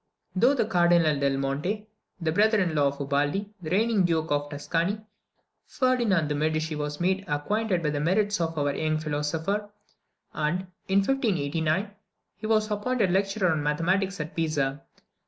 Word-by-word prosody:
Through 240 +9 +4
the 245 - +1
Cardinal 175 -6 +3
del 140 -1 +1
Monte, 150 +11 -2 0.3
the 165 -2 0
brother 215 +5 +3
in 180 -4 +1
law 145 -2 +3
of 140 +1 -3
Ubaldi, 145 +9 -1
the 155 - -5
reigning 210 +2 +2
Duke 160 -3 0
of 145 0 0
Tuscany, 165 +7 -1 0.7
Ferdinand 235 - +1
de 150 - -1
Medici 155 +1 -1
was 150 0 -4
made 190 +2 +1
acquainted 180 +5 0
with 150 -1 0
the 145 - -1
merits 200 +5 +1
of 165 -1 -2
our 145 -1 +1
young 155 +1 0
philosopher; 160 +7 -2 0.6
and, 155 +4 0 0.3
in 195 +1 +4
1589, 185 - 0 0.5
he 215 - -5
was 215 -1 +2
appointed 210 -1 0
lecturer 195 -1 +1
on 155 -2 0
mathematics 180 +6 0
at 150 +1 -5
Pisa. 145 -4 -1
170 Hz, 155 wpm, -27 LUFS, 150-205 Hz, 0.7 s, Through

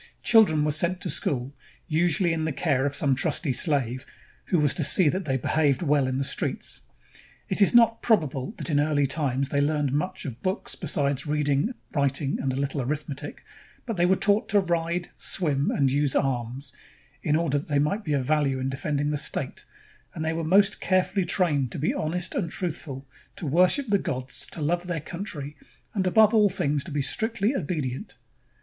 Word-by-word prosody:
Children 210 -10 +5
were 150 - +1
sent 170 +4 +1
to 180 - -1
school, 130 0 -1 0.3
usually 170 +1 +2
in 160 -1 -2
the 160 - -1
care 140 -2 0
of 140 - -3
some 140 -1 +2
trusty 145 0 0
slave 130 -3 0 0.4
who 180 - +1
was 150 -3 +2
to 160 - -1
see 150 +3 +4
that 185 +5 -2
they 135 -2 0
behaved 145 +2 +1
well 145 -3 +2
in 130 0 -1
the 135 - 0
streets. - - -1 0.7
It - - +3
is 200 - +5
not 230 -1 +5
probable 160 - 0
that - - -4
in 145 - +3
early 145 -1 +2
times 140 -2 -1
they 140 - +1
learned 145 -2 0
much 185 +6 -2
of 125 -4 -7
books 185 +2 -2
besides 140 0 -1
reading, 150 - 0 0.2
writing, 140 -1 0
and 135 - -1
a - - -3
little 140 +1 -2
arithmetic; 145 +1 -5 0.4
but 230 -4 -3
they 175 -1 +2
were 190 - +4
taught 205 +2 +2
to 205 - +4
ride, 175 -1 -1
swim, 145 -6 0
and 135 -3 +1
use 145 0 +1
arms, 125 +1 -2 0.5
in 150 - +1
order 155 -3 +1
that - - -10
they 145 - 0
might 175 +10 0
be 155 - -2
of 135 -3 0
value 145 -2 +1
in 130 +1 -2
defending 145 +2 -2
the 150 - -1
state, - - -3 0.5
and 160 -1 -3
they 160 - 0
were 165 0 -3
most 195 +5 +3
carefully 185 0 +1
trained 150 -8 +1
to - - -4
be 150 - 0
honest 170 +3 -2
and 175 -5 -2
truthful, 150 -6 -4 0.3
to - - -6
worship 180 - +3
the 200 -1 +3
gods, 130 -4 -3
to 160 - -7
love 175 +4 -1
their 170 -2 -2
country, 155 -3 -6 0.4
and 190 -3 0
above 215 +3 +5
all 210 -2 +5
things 145 -6 -1
to - - -7
be 145 -1 -1
strictly 220 - 0
obedient. 145 - -4
150 Hz, 195 wpm, -26 LUFS, 140-180 Hz, 0.7 s, Children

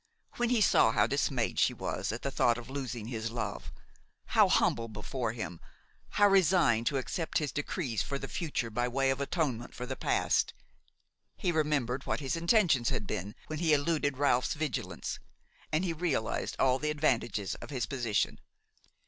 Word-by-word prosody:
When 240 -1 +1
he 240 -3 +3
saw - - +5
how - - +4
dismayed - - 0
she - - +3
was - - -3
at - - -6
the - - -1
thought 120 -1 +3
of 120 +1 -9
losing 130 -5 -4
his 115 -2 -3
love–how 115 0 -2
humble 115 0 +2
before 115 +2 -3
him, 90 -7 -5 0.6
how 205 0 +7
resigned 175 - +4
to 140 - +1
accept 160 +5 -2
his 150 -3 -1
decrees 145 - -2
for 140 - -2
the 135 - -6
future 140 -9 -3
by 120 +3 0
way 135 +2 +1
of 135 +1 -2
atonement 140 -6 -2
for 125 - -5
the 130 +1 -4
past–he 180 - -2
remembered 145 -5 0
what - - 0
his 140 +2 -2
intentions 170 - +3
had 105 - -2
been 100 +2 -4
when 155 -1 -5
he 165 -2 +3
eluded 145 -2 +1
Ralph's 130 -3 +2
vigilance, 125 - -3 0.5
and 155 +5 +1
he 170 - 0
realized 150 -9 -1
all 130 0 +3
the 150 - -1
advantages 120 -9 0
of - - -9
his 130 -5 -2
position. 120 -6 -1
135 Hz, 165 wpm, -31 LUFS, 120-155 Hz, 0.6 s, how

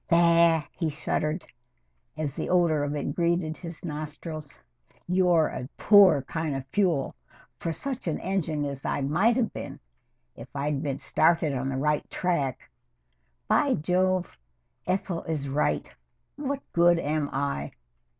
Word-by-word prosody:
"Bah!" 170 -2 +5
he 165 -3 -2
shuddered 155 +2 -2 0.7
as 150 -3 -2
the - - -4
odor 170 -5 +3
of 145 +1 -2
it 145 -1 -2
greeted 170 -1 0
his 170 -1 -9
nostrils. 155 -1 -6 0.5
"You're 180 -3 +4
a 125 - -6
poor 195 -9 +6
kind 160 0 -3
of 135 -1 -4
fuel 175 -9 +1 0.5
for 165 - -2
such 260 - -5
an 160 - -1
engine 165 -6 -1
as 140 -1 -5
I - - -1
might 175 - +2
have 235 -4 0
been - - -7 0.6
if 115 - -10
I'd 140 0 -1
been 140 -3 -2
started 155 +2 +2
on 130 0 -2
the 135 - -2
right 150 +2 0
track. 160 -8 -1 0.8
By - - +3
Jove! 185 +3 0 0.5
Ethel 180 -2 -1
is 150 -4 -2
right. 135 - -1 0.4
What 280 -1 -3
good 175 0 +5
am 150 -2 -1
I? 135 - -2
160 Hz, 140 wpm, -27 LUFS, 145-175 Hz, 0.8 s, poor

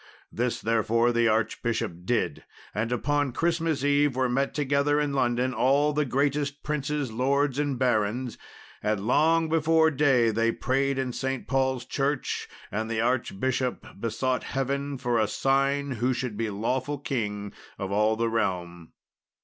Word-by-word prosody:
This, 120 +1 -1
therefore, 115 +1 +2
the 120 0 +2
archbishop 115 +1 0
did, 90 -9 -1 0.3
and 110 +4 -2
upon 145 +2 0
Christmas 165 -2 0
Eve 145 -1 +3
were 130 0 +2
met 135 +3 0
together 145 0 +2
in 145 -1 0
London 125 -1 +1
all 140 +6 +3
the 150 0 +1
greatest 140 +2 -1
princes, 150 -3 -2
lords, 135 +3 +1
and 145 -3 0
barons; 120 0 0 0.5
and 105 -1 -1
long 160 +6 +3
before 160 0 +3
day 130 -5 +3
they 115 +1 +2
prayed 135 +3 0
in 130 -2 -2
St. 135 0 -3
Paul's 130 -2 0
Church, 140 +1 -1 0.2
and 110 +1 -2
the 115 -1 -1
archbishop 125 +1 -1
besought 125 +4 -1
Heaven 140 +1 -2
for 120 -2 0
a 110 - +2
sign 135 +3 +1
who 125 +1 0
should 125 -4 -3
be 115 +1 -2
lawful 130 +8 -2
king 105 -7 -3 0.2
of 95 0 -4
all 105 +2 +2
the 115 +1 0
realm. 90 -6 -2
130 Hz, 150 wpm, -27 LUFS, 115-140 Hz, 0.5 s, Eve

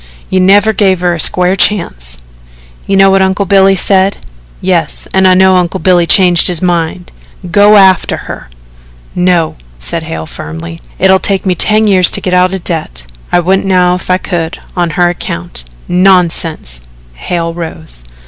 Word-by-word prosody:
You 185 - +1
never 200 +3 +3
gave 190 -3 +1
her 175 -1 0
a 170 - -5
square 180 +3 +2
chance." 60 - 0 0.7
"You 195 - +1
know 195 0 +5
what 195 0 +2
Uncle 190 +1 0
Billy 195 +1 +3
said?" 195 +1 +2 0.4
"Yes, 175 -5 -1
an' 190 0 +3
I 185 - +4
know 190 0 +4
Uncle 175 -2 -1
Billy 175 0 +2
changed 175 0 +4
his 175 -3 0
mind. 175 0 -2 0.4
Go 205 +2 +5
after 190 -2 +3
her." - - -9 0.6
"No," 180 -3 0 0.2
said - - -4
Hale 80 0 -6
firmly. 80 +2 -9 0.2
"It'll 190 0 +3
take 195 0 -1
me 185 - +1
ten 215 +4 +2
years 185 -4 +4
to - - +2
get 180 - -3
out 180 0 +2
of 190 -2 -5
debt. - - -4 0.3
I 175 - +2
wouldn't 190 +3 0
now 180 -2 +2
if 180 - -6
I 185 - +2
could 170 -3 -4 0.2
on 175 -2 -1
her 175 -1 +3
account." 85 - -5 0.2
"Nonsense." 175 - +1 0.3
Hale 165 - -4
rose. 160 - -6
180 Hz, 165 wpm, -10 LUFS, 165-190 Hz, 0.7 s, know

